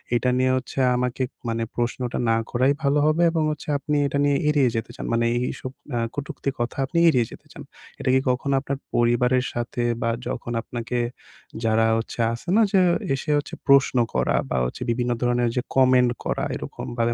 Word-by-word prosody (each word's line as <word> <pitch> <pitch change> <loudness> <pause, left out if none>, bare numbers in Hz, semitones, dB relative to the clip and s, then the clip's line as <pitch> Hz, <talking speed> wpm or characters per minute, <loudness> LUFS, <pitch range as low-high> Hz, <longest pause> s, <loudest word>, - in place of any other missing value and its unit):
এটা 120 +2 +1
নিয়ে 130 0 +2
হচ্ছে 130 +1 -5 0.2
আমাকে 125 +1 -1 0.3
মানে 115 0 -1
প্রশ্নটা 120 +1 -2
না 115 - +3
করাই 130 +3 +3
ভালো 140 +1 +3
হবে 155 +3 +3
এবং 165 -1 0
হচ্ছে 150 - -7
আপনি 150 +1 -2
এটা 140 - -2
নিয়ে 145 -1 +3
এড়িয়ে 145 -4 +3
যেতে 115 -1 -3
চান। - - -6
মানে 115 0 +2 0.2
এইসব 130 - -6 0.3
আ - - +1 0.2
কটুক্তি 145 -1 -4
কথা 120 - -2
আপনি 170 - -4
এড়িয়ে 125 -7 +4
যেতে - - -13
চান। - - -10 0.4
এটা - - -1
কি 130 - +5
কখনো 135 +2 0
আপনার 140 0 -4 0.2
পরিবারের 125 +2 +2
সাথে 120 0 -3 0.2
বা 115 - +1 0.2
যখন 120 - -4
আপনাকে 120 +1 -4 0.6
যারা 115 0 +3
হচ্ছে 115 - -5
আছে 120 - -9
না? 225 - +5
যে 195 - +4 0.3
এসে 135 +3 -2 0.4
প্রশ্ন 140 -2 +5 0.2
করা - - +1
বা 65 - -1
হচ্ছে - - -6
বিভিন্ন 120 +1 -1
ধরনের 120 -1 +2
যে 125 - +1
কমেন্ট 130 -2 +5
করা, - - -1
এরকমভাবে 120 -1 -3
125 Hz, 180 wpm, -24 LUFS, 120-140 Hz, 0.6 s, কি